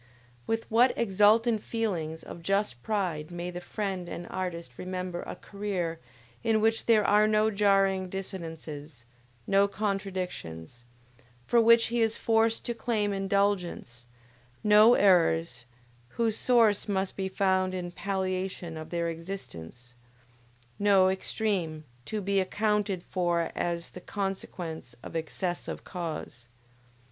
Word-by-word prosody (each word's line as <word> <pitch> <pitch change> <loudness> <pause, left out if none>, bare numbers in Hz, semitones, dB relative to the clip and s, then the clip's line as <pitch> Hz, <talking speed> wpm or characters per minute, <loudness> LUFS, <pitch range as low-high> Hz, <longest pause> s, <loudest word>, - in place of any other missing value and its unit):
With 225 0 0
what 240 +3 +4
exultant 220 +2 +4
feelings 175 -10 -3
of 170 - -9
just 195 -9 0
pride 180 - -2
may 175 0 -5
the 175 0 -6
friend 190 -3 -4
and 175 - -6
artist 170 -8 -5
remember 180 -1 -4
a - - -5
career 190 -5 -4 0.4
in 220 -1 +3
which 225 +1 +1
there 220 -3 +5
are 210 +1 +5
no 215 0 +3
jarring 195 -2 +2
dissonances; 160 -8 -7 0.4
no 200 0 +4
contradictions, 185 - -4 0.6
for 235 - +4
which 230 0 +6
he 240 - +2
is 225 -1 +2
forced 225 0 +2
to 240 - -1
claim 220 -3 -1
indulgence; 195 -10 -1 0.6
no 215 +3 +7
errors, 165 -8 +3 0.5
whose 225 -2 +1
source 225 -5 +3
must 190 -1 -1
be 190 -1 -2
found 190 -1 +1
in 175 -1 -4
palliation 185 -3 -3
of 155 - -7
their 170 -1 -1
existence; 145 - -8 0.9
no 200 -2 +5
extreme, 190 -5 -1 0.2
to 215 -1 -3
be 200 0 +1
accounted 205 -1 0
for 175 -2 0
as 170 -1 -2
the 180 - -10
consequence 180 - -5
of - - -9
"excess 175 +2 -3
of - - -5
cause." 160 -9 -6
190 Hz, 125 wpm, -28 LUFS, 170-210 Hz, 0.9 s, no